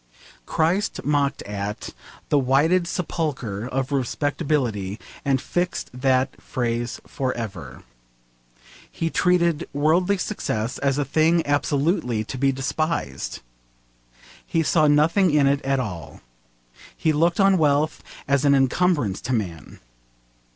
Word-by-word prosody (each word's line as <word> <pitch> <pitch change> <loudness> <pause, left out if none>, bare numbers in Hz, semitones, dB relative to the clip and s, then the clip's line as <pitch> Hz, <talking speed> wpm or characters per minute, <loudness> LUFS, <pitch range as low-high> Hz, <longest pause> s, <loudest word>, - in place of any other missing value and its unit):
Christ 175 +6 0
mocked 145 -1 +1
at 100 0 -5 0.4
the 145 - +4
'whited 150 +7 +3
sepulchre' 135 - -3
of 135 +1 -2
respectability, 130 - -1 0.2
and 135 -1 +2
fixed 175 +6 -2
that 130 +1 0
phrase 120 -1 -2
for 130 -2 -2
ever. 90 - -7 1.1
He 165 0 -3
treated 170 -3 +2
worldly 170 +7 +2
success 125 - -3
as 140 -1 +1
a 145 - 0
thing 160 +4 +2
absolutely 145 - 0
to 130 - -7
be 135 0 +3
despised. 135 - -3 1.0
He 165 - 0
saw 155 0 +3
nothing 160 +6 +4
in 150 -2 +3
it 140 +1 +2
at 135 0 0
all. 90 -10 -6 0.8
He 160 - +1
looked 170 +4 +2
on 195 -2 +5
wealth 150 +1 +2 0.3
as 140 0 +2
an 140 -1 +5
encumbrance 135 - +1
to 130 - -2
a - - +3
man. 85 -9 -5
140 Hz, 125 wpm, -23 LUFS, 125-160 Hz, 1.1 s, on